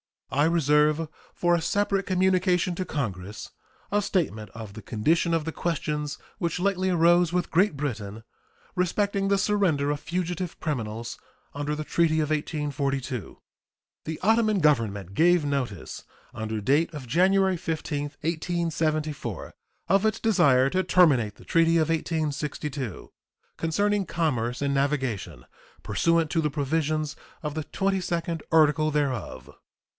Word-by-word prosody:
I 145 +2 +3
reserve 150 -1 +3 0.3
for 175 0 +2
a 170 - +2
separate 200 +2 0
communication 185 -1 +2
to 185 - -3
Congress 105 - -4 0.4
a 205 0 +2
statement 110 - -1
of 110 -3 -9
the 110 - -9
condition 150 - +1
of 165 -2 +1
the 160 - -2
questions 150 -3 -2 0.2
which 170 0 -1
lately 190 0 +1
arose 175 0 +4
with 180 -1 -1
Great 185 0 +3
Britain 115 -7 -4 0.5
respecting 195 +2 0
the 200 0 +3
surrender 185 -9 +1
of 145 - -2
fugitive 175 +1 -3
criminals 115 -6 -4 0.3
under 145 +1 -2
the 155 - -4
treaty 160 0 +2
of 155 -1 0
1842. 140 - -2 0.7
The 160 0 -4
Ottoman 215 -1 +3
Government 110 - +1
gave 175 - +4
notice, 130 - -3 0.3
under 110 0 -4
date 145 +10 +2
of 145 -4 -7
January 185 +7 +3
15, 155 -3 -3 0.2
1874, 155 - -2 0.4
of 195 +2 +4
its 215 - +1
desire 145 - +4
to 185 - +2
terminate 150 - +3
the - - -16
treaty 165 0 +3
of 160 -1 +2
1862, 150 - -3 0.5
concerning 205 +5 +1
commerce 125 -6 -1
and 140 0 +1
navigation, 130 - -1 0.4
pursuant 165 -2 +1
to 165 - +2
the 150 - 0
provisions 155 +1 -1 0.3
of 150 -1 -3
the 155 -1 -4
twenty 195 +2 0
second 170 -2 -2
article 155 -1 +4
thereof. 140 -6 -2
155 Hz, 135 wpm, -26 LUFS, 140-175 Hz, 0.7 s, arose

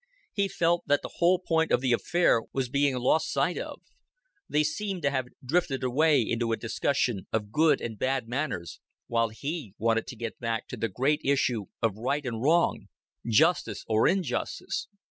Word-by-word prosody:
He 200 -1 +1
felt 170 -2 +1
that 145 - +2
the - - -8
whole 175 +2 +4
point 165 -2 0
of - - +4
the 125 -1 +1
affair 160 -2 +3
was 130 -2 -1
being 140 0 +2
lost 125 +6 +2
sight - - +1
of; - - -7 0.7
they 150 +1 +3
seemed 185 +3 -3
to 140 - +2
have 130 -2 -1 0.2
drifted 140 -2 0
away 140 +3 +3
into 115 +1 -1
a 115 - +1
discussion 120 -3 -1
of 105 -2 -2
good 150 +1 +4
and 110 -2 -6
bad 130 -3 0
manners, 120 - -3 0.3
while 115 -1 +1
he 140 - -5
wanted 115 0 +1
to - - -7
get 115 0 -6
back 115 -1 -2
to - - -5
the 115 -1 -2
great 135 +10 +1
issue 125 -6 +1 0.2
of 110 -3 +1
right 140 +5 -1
and 115 -3 -3
wrong, 165 +6 +2 0.4
justice 155 +9 +2
or 110 0 +3
injustice. 190 -2 -1
130 Hz, 180 wpm, -28 LUFS, 115-155 Hz, 0.7 s, whole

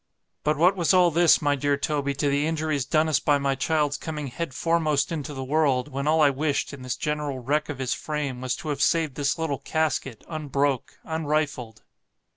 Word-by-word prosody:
But 150 0 +1
what 180 +5 +4
was 180 0 +2
all 180 -2 +5
this, 170 0 +4
my 145 -1 +3
dear 145 +1 0
Toby, 145 -2 -1
to 145 +1 0
the 145 +2 +1
injuries 155 -4 -1
done 155 0 +2
us 155 - +2
by 145 -1 +2
my 140 -1 0
child's 145 +1 0
coming 150 -3 -5
head 165 +4 -4
foremost 155 0 +1
into 150 -2 -4
the 135 -2 -5
world, 140 -1 +1
when 140 +1 -3
all 160 +1 +3
I 145 - +5
wished, 145 +1 -1
in 140 - -9
this 130 -1 -3
general 150 -2 -2
wreck 145 +5 -1
of 145 - -4
his 130 -2 -1
frame, 145 -5 -4
was 130 -1 -1
to 155 - -7
have 145 -1 -2
saved 160 -4 +2
this 140 +1 -1
little 160 -4 -2
casket 145 -7 -2
unbroke, 145 -4 -2
unrifled. 150 -7 -2
145 Hz, 205 wpm, -25 LUFS, 140-155 Hz, -, all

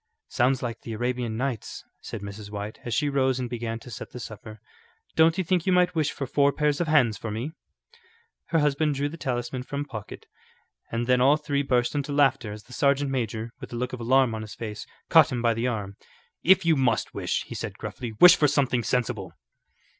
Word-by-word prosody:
"Sounds 130 +1 +1
like 115 -2 -4
the 115 - -6
Arabian 120 0 -2
Nights," 125 -3 -3 0.2
said 110 - -7
Mrs. 100 +1 -8
White, 105 +1 -6
as 120 - -5
she 145 +6 +1
rose 130 -2 +1
and 125 - -2
began 115 -1 -4
to 120 +2 -12
set 120 +3 -7
the 125 - -9
supper. 110 -1 -9 0.6
"Don't 160 +1 +5
you 190 - +1
think 180 0 0
you - - +4
might 180 0 +3
wish 155 -3 +1
for 140 - -4
four 140 +2 +3
pairs 150 +1 0
of 170 - 0
hands 130 -9 +3
for 115 - -5
me?" 115 +8 -4 0.9
Her 165 - 0
husband 150 0 +2
drew 140 +1 -1
the 165 - -9
talisman 125 -3 -3
from 140 +2 -4
pocket, 110 -7 -8 0.7
and 115 +1 -1
then 125 0 +3
all 140 +4 +5
three 145 -2 -1
burst 125 -3 +1
into 145 0 -2
laughter 135 -6 +2
as 105 0 -9
the 125 - -15
sergeant 140 +1 +2
major, 115 -3 -3
with - - -9
a - - -3
look 125 +2 -3
of 125 - -5
alarm 130 0 +3
on 110 - -4
his 105 -1 -8
face, 105 -2 -6 0.2
caught - - +6
him 125 - -1
by 115 -1 +3
the 115 +2 -1
arm. 105 -5 -4 0.4
"If 190 0 +5
you 165 -1 +4
must 125 -5 +1
wish," - - -1
he - - -9
said, - - -5
gruffly, 120 -3 -6
"wish 180 - +10
for 150 - +3
something 135 -4 +1
sensible." 110 -6 -2
125 Hz, 215 wpm, -26 LUFS, 115-145 Hz, 0.9 s, wish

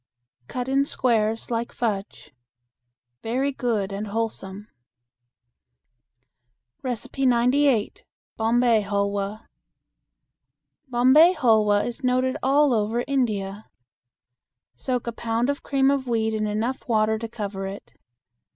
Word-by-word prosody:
Cut 250 0 -4
in 270 +1 +2
squares 225 -4 0
like 230 0 -2
fudge. 200 -8 -4 0.9
Very 260 +5 -1
good 225 -7 -2
and 205 +2 -4
wholesome. 205 -2 -4 2.2
98. 250 0 +1 0.3
Bombay 230 0 +3
Hulwa. 200 +1 -2 1.4
Bombay 260 +8 +5
hulwa 215 -6 +3
is 240 +2 -6
noted 255 +1 +1
all 280 +1 +3
over 225 +2 0
India. 215 -6 -2 1.1
Soak 250 -2 -3
a 235 - -2
pound 230 +3 -1
of 285 - -6
cream 275 -1 +2
of 275 -2 -1
wheat 220 -2 0
in 215 -1 -1
enough 220 +5 -3
water 220 -1 +2
to 230 - -4
cover 200 -4 -5
it. 195 +1 -9
230 Hz, 105 wpm, -24 LUFS, 210-255 Hz, 2.2 s, Bombay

